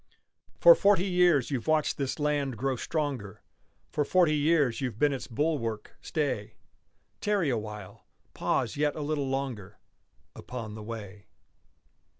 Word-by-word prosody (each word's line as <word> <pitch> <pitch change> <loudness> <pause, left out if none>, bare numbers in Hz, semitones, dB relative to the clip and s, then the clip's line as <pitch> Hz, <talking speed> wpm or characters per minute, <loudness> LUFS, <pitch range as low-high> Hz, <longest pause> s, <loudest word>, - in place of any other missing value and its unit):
For - - +10
forty 200 - +3
years 180 -8 +3
you've 130 -2 -3
watched 155 -1 +2
this 135 -2 -2
land 145 -4 -1
grow 135 +2 -1
stronger, 135 - -3 0.5
For 150 - +1
forty 170 0 +3
years 145 -4 +2
you've 125 -5 -3
been 145 +3 +3
its 135 - -5
bulwark, 115 -5 -2
stay; 140 -9 -2 0.6
Tarry 200 -8 +1
awhile; 105 -4 -6 0.3
pause - - -1
yet 145 0 0
a 155 - -5
little 145 -2 -1
longer 130 -7 -4 0.6
Upon 115 -4 -7
the 110 - -8
way. 105 -2 -8
140 Hz, 135 wpm, -28 LUFS, 115-155 Hz, 0.6 s, For